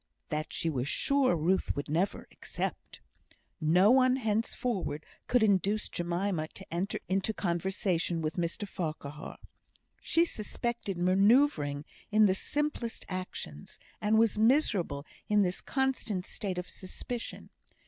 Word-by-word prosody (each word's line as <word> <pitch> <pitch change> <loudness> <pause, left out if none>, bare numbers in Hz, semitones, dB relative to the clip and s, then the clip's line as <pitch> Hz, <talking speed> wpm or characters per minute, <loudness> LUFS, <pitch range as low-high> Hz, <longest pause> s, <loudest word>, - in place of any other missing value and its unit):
That 155 +1 -2
she - - -1
was 135 -5 -1
sure 275 - +2
Ruth 175 +4 +1
would 145 - -3
never 170 +6 -1
accept. - - -5 0.6
No 180 +6 +5
one 255 0 +5
henceforward 220 - -1 0.2
could 245 -2 +3
induce 205 +1 +2
Jemima 175 -1 -1
to 190 - -8
enter 180 +4 -1
into 195 +3 0
conversation 175 -1 0
with 155 0 -1
Mr 175 +4 -2
Farquhar. 155 -5 -5 0.6
She 335 +1 +3
suspected 225 - -3
manoeuvring 185 - +3 0.2
in 215 0 +5
the 190 - +4
simplest 290 +1 -2
actions, 185 - -6 0.2
and 215 +1 +3
was 220 -1 +3
miserable 215 - +2 0.2
in 210 -1 +5
this 180 -1 0
constant 255 -8 -1
state 190 -3 -3
of 180 - -3
suspicion. 230 +5 -6
190 Hz, 125 wpm, -30 LUFS, 170-225 Hz, 0.6 s, No